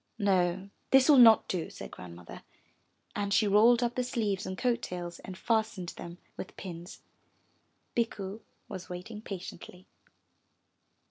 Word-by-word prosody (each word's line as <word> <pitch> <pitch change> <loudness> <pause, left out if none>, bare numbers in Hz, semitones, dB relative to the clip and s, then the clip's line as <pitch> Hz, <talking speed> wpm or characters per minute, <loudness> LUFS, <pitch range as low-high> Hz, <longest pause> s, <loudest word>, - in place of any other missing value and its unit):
''No, 190 -1 +1 0.2
this 270 -1 +6
will 285 -3 +8
not 225 -2 +8
do,'' 175 -4 -2
said - - -9
Grandmother, 85 -1 -10 0.7
and 200 -1 -2
she 210 +2 +4
rolled 230 +4 +5
up 240 0 0
the 250 - -1
sleeves 220 -6 -1
and 185 - -4
coat 240 +1 +1
tails 175 -1 -6
and 185 -1 -9
fastened 220 -5 0
them 170 -1 -9 0.2
with - - -8
pins. 175 -1 -8 0.9
Bikku 215 -3 -2 0.3
was 185 -2 -8
waiting 185 +5 -7
patiently. 185 -2 -8
200 Hz, 135 wpm, -30 LUFS, 180-230 Hz, 0.9 s, will